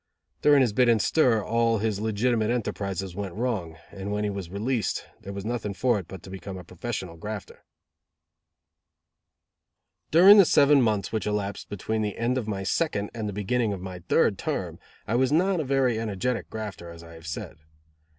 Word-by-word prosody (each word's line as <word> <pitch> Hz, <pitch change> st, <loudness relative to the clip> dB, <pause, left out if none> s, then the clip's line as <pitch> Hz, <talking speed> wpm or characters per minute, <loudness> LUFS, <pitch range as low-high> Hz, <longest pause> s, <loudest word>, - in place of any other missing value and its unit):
During 145 Hz, -2 st, +6 dB
his 120 Hz, -5 st, +2 dB
bit 125 Hz, +2 st, +4 dB
in 115 Hz, -, +5 dB
stir 115 Hz, -1 st, +3 dB
all 115 Hz, 0 st, +2 dB
his 105 Hz, -1 st, -1 dB
legitimate 110 Hz, +1 st, +1 dB
enterprizes 100 Hz, -6 st, -2 dB
went 95 Hz, -2 st, -5 dB
wrong, 105 Hz, -9 st, -2 dB
and 100 Hz, 0 st, -6 dB
when 105 Hz, 0 st, -1 dB
he 105 Hz, -, 0 dB
was 100 Hz, -4 st, -6 dB
released, 110 Hz, +5 st, -1 dB
there 100 Hz, -, -8 dB
was 100 Hz, 0 st, -6 dB
nothing 110 Hz, -4 st, -3 dB
for 120 Hz, +2 st, +2 dB
it 90 Hz, -, -9 dB
but 95 Hz, -3 st, -10 dB
to 95 Hz, -, -10 dB
become 95 Hz, 0 st, -7 dB
a 90 Hz, -, -8 dB
professional 90 Hz, -1 st, -6 dB
grafter. 105 Hz, +2 st, -7 dB, 2.5 s
During 190 Hz, +6 st, +8 dB
the 195 Hz, -, +8 dB
seven 145 Hz, -2 st, +5 dB
months 105 Hz, -5 st, 0 dB
which 110 Hz, -1 st, -2 dB
elapsed 100 Hz, -1 st, -3 dB
between 110 Hz, +2 st, -2 dB
the 105 Hz, -2 st, -2 dB
end 125 Hz, +2 st, 0 dB
of 110 Hz, -, -6 dB
my 100 Hz, -2 st, -3 dB
second, 105 Hz, -, -1 dB
and 110 Hz, -3 st, -3 dB
the -, -, -5 dB
beginning 105 Hz, +2 st, 0 dB
of 95 Hz, -, -5 dB
my 90 Hz, -1 st, -6 dB
third -, -, +3 dB
term, -, -, -3 dB, 0.3 s
I 110 Hz, -, -2 dB
was 130 Hz, +2 st, +2 dB
not 180 Hz, +4 st, +2 dB
a -, -, 0 dB
very 130 Hz, -4 st, +1 dB
energetic 110 Hz, -3 st, -2 dB
grafter, 105 Hz, -5 st, -6 dB
as 85 Hz, 0 st, -11 dB
I 85 Hz, 0 st, -12 dB
have 80 Hz, 0 st, -12 dB
said. 80 Hz, -, -6 dB
105 Hz, 190 wpm, -26 LUFS, 95-120 Hz, 2.5 s, During